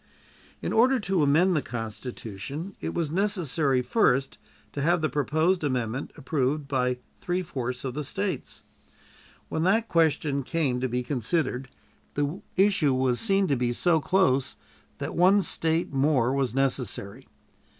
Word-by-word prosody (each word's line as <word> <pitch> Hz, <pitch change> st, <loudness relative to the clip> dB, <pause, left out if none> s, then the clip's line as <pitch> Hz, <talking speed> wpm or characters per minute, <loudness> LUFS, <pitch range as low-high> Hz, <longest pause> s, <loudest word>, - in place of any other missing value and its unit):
In -, -, -1 dB
order 250 Hz, +4 st, +5 dB
thus 235 Hz, -, -3 dB
to 190 Hz, -4 st, +2 dB
amend 165 Hz, +6 st, +4 dB
the 150 Hz, -, +2 dB
Constitution, 120 Hz, -, -6 dB
it -, -, -4 dB
was 165 Hz, -4 st, -1 dB
necessary 165 Hz, -, +1 dB
first 135 Hz, -, +1 dB, 0.3 s
to 140 Hz, -, -4 dB
have 175 Hz, +4 st, +3 dB
the 155 Hz, -, +1 dB
proposed 160 Hz, +5 st, +1 dB
amendment 125 Hz, -2 st, -2 dB
approved 140 Hz, +1 st, -1 dB
by 125 Hz, -2 st, 0 dB, 0.2 s
three 180 Hz, +1 st, -1 dB
fourths 125 Hz, -6 st, -4 dB
of 130 Hz, -, -3 dB
the 150 Hz, +3 st, -3 dB
States. 190 Hz, +7 st, -4 dB, 0.8 s
When 160 Hz, -, -2 dB
that 220 Hz, +6 st, +2 dB
question 155 Hz, -4 st, +2 dB
came 140 Hz, -3 st, -1 dB
to 130 Hz, 0 st, -1 dB
be 125 Hz, +1 st, -1 dB
considered, 130 Hz, +1 st, -1 dB, 0.5 s
the 145 Hz, +5 st, -1 dB
issue 190 Hz, -8 st, +3 dB
was 130 Hz, -1 st, +1 dB
seen 195 Hz, -3 st, +2 dB
to 145 Hz, -, +1 dB
be 120 Hz, -1 st, 0 dB
so 165 Hz, +5 st, +2 dB
close 140 Hz, -7 st, +2 dB, 0.4 s
that -, -, -4 dB
one 190 Hz, +3 st, +4 dB
State 165 Hz, -2 st, 0 dB
more 135 Hz, -3 st, +2 dB
was 135 Hz, -3 st, 0 dB
necessary. 130 Hz, -7 st, -2 dB
145 Hz, 150 wpm, -26 LUFS, 130-175 Hz, 0.8 s, order